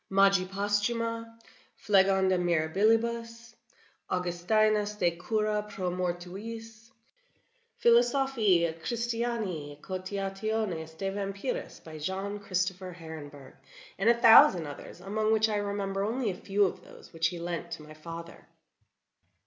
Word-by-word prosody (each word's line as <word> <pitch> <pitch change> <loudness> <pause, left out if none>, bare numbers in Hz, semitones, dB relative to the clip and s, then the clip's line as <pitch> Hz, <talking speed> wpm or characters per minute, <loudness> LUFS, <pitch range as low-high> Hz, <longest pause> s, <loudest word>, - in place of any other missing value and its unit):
"Magia 195 -1 +4
Posthuma," 230 +4 -1 0.4
"Phlegon 190 -1 +3
de 185 - +3
Mirabilibus," 225 +7 +1 0.6
"Augustinus 205 +4 +1
de 180 -4 +2
cura 210 +4 -1
pro 185 -3 -3
Mortuis," 205 +6 -5 0.9
"Philosophicae 235 -6 +4
et 160 0 -9
Christianae 230 -11 -2
Cogitationes 195 -2 -3
de 195 +2 -2
Vampiris," 200 +4 -4
by 155 -1 -9
John 195 +5 -3
Christofer 185 -1 -2
Herenberg; 145 -5 -10 0.5
and 205 +4 +3
a 235 - +6
thousand 190 -7 +8
others, 145 -1 -9
among 215 +3 0
which 220 0 +4
I 215 -1 -1
remember 200 -1 -2
only 225 +1 -1
a - - -4
few 200 +2 +1
of 185 - -4
those - - -15
which 165 +1 +1
he 175 0 -5
lent 170 0 -4
to 160 - -7
my 155 0 -12
father. 165 +2 -9
195 Hz, 120 wpm, -29 LUFS, 175-220 Hz, 0.9 s, thousand